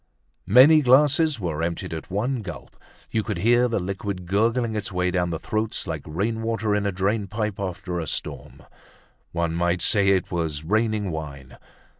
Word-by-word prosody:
Many 150 +5 +7
glasses 145 +2 +4
were 80 -5 -3
emptied 85 0 -3
at 80 - -7
one 115 +6 -1
gulp. 85 -10 -9 0.4
You 110 - +1
could 105 -3 -4
hear 120 +6 +3
the 115 - -1
liquid 95 0 -4
gurgling 115 +5 +1
its 105 -2 -3
way 90 0 0
down 90 -1 0
the 80 - -2
throats 110 +5 -3
like 80 -5 -4
rainwater 110 +5 -1
in 105 0 0
a - - 0
drainpipe 105 +2 -2
after 90 -2 -4
a 80 - -4
storm. - - -5 0.7
One 85 -1 -1
might 85 +1 0
say 100 +2 +3
it 95 -2 +2
was 80 -4 -2
raining 110 +1 0
wine. 70 -4 -8
100 Hz, 165 wpm, -24 LUFS, 85-110 Hz, 0.7 s, Many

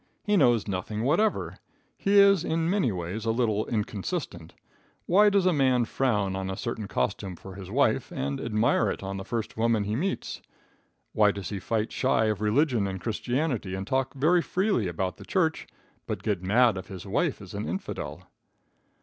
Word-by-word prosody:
He 210 -1 +1
knows 120 - +4
nothing 105 +3 -3
whatever. 205 - +1 0.4
He 200 +1 +2
is 200 -3 +6
in 165 0 0
many 190 - +2
ways 90 +4 -4
a 115 - -1
little 110 -2 +1
inconsistent. 105 - -4 0.5
Why 205 +4 +5
does 200 -2 +2
a 185 - +4
man 130 -4 +3
frown 105 -6 0
on 95 0 -3
a 95 - -4
certain 115 -3 -4
costume 100 -2 -2
for 95 +3 -11
his 95 -1 -9
wife, - - +1
and 70 +1 -3
admire 110 -1 +2
it - - -4
on 95 0 -4
the 95 - -5
first 115 +1 -4
woman 115 -2 +2
he 105 +2 -2
meets? 190 +10 -3 0.7
Why 105 -1 +5
does 100 -1 -4
he 100 - -4
fight 110 +3 -1
shy 110 - +2
of 105 -2 -1
religion 115 -1 +2
and 95 -1 -4
Christianity 120 - -2
and 95 0 -4
talk 130 +4 -1
very 165 +6 +3
freely 185 - 0
about 90 +2 -3
the - - -11
church, 165 -4 0 0.4
but - - -4
get 100 -4 -1
mad 110 +3 +3
if 95 - -7
his 95 -3 -8
wife - - 0
is - - -11
an - - -4
infidel? - - -5
110 Hz, 185 wpm, -27 LUFS, 100-145 Hz, 0.7 s, is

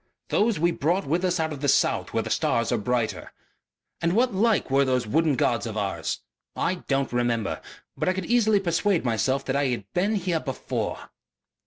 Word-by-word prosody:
Those 220 0 +2
we 170 +2 +3
brought 170 +5 0
with 170 +6 0
us 180 -1 +1
out 160 -1 -1
of 140 - -8
the 145 - 0
south - - +2
where - - 0
the - - -5
stars 115 -1 +1
are - - +2
brighter. 120 0 -2 0.7
And 170 +1 +1
what 245 +2 +2
like 210 -6 +2
were 135 +1 +4
those 130 -2 +1
wooden 150 +6 +2
gods 120 -1 +1
of 110 -1 -5
ours? 100 -2 -2 0.3
I 180 +1 -1
don't 135 -3 0
remember.... 120 -3 0 0.3
But - - 0
I - - +2
could 190 -1 -4
easily 220 -3 +3
persuade 175 -2 +1
myself 125 +4 0
that 135 - -1
I 140 0 +2
had 120 -6 -2
been 200 +5 +1
here 180 -4 0
before." 135 -4 -4
155 Hz, 195 wpm, -25 LUFS, 125-185 Hz, 0.7 s, were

